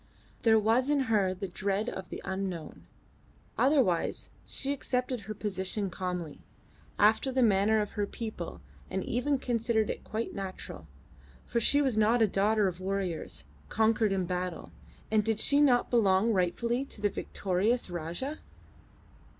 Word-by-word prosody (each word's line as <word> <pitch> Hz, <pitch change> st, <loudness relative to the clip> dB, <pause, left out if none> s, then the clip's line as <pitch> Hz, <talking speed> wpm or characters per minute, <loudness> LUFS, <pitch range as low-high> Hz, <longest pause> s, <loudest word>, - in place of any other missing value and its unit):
There 225 Hz, -1 st, +5 dB
was 225 Hz, +5 st, +2 dB
in 290 Hz, -2 st, +3 dB
her 200 Hz, -4 st, +3 dB
the 190 Hz, +1 st, -4 dB
dread 195 Hz, +4 st, -2 dB
of 190 Hz, -6 st, -5 dB
the -, -, -7 dB
unknown; 190 Hz, -4 st, -5 dB, 0.7 s
otherwise 255 Hz, -, +2 dB, 0.2 s
she 275 Hz, +1 st, -3 dB
accepted 255 Hz, -2 st, -2 dB
her 215 Hz, +1 st, -7 dB
position 195 Hz, -1 st, -2 dB
calmly, 180 Hz, -4 st, -4 dB, 0.6 s
after 220 Hz, +6 st, +4 dB
the 260 Hz, 0 st, +2 dB
manner 215 Hz, 0 st, +4 dB
of 210 Hz, -, -4 dB
her 205 Hz, -1 st, -2 dB
people, 215 Hz, -8 st, -6 dB, 0.3 s
and 190 Hz, -, -2 dB
even 275 Hz, +4 st, 0 dB
considered 230 Hz, -3 st, 0 dB
it -, -, -7 dB
quite 225 Hz, +2 st, -4 dB
natural; 185 Hz, -, -7 dB, 0.6 s
for -, -, -3 dB
was 230 Hz, -, +2 dB
she 285 Hz, +5 st, +4 dB
not 230 Hz, -3 st, +3 dB
a -, -, +4 dB
daughter 205 Hz, +2 st, +2 dB
of 180 Hz, -1 st, -4 dB
warriors, 185 Hz, -, -3 dB, 0.3 s
conquered 220 Hz, -1 st, +2 dB
in 190 Hz, -2 st, 0 dB
battle, 180 Hz, 0 st, -4 dB, 0.4 s
and 215 Hz, -1 st, +3 dB
did 220 Hz, 0 st, 0 dB
she 285 Hz, +4 st, +4 dB
not 250 Hz, -4 st, +3 dB
belong 220 Hz, -1 st, +3 dB
rightfully 235 Hz, +7 st, 0 dB
to 250 Hz, -, -9 dB
the 205 Hz, 0 st, +2 dB
victorious 205 Hz, +6 st, 0 dB
Rajah? 175 Hz, -, -4 dB
210 Hz, 150 wpm, -30 LUFS, 190-235 Hz, 0.7 s, There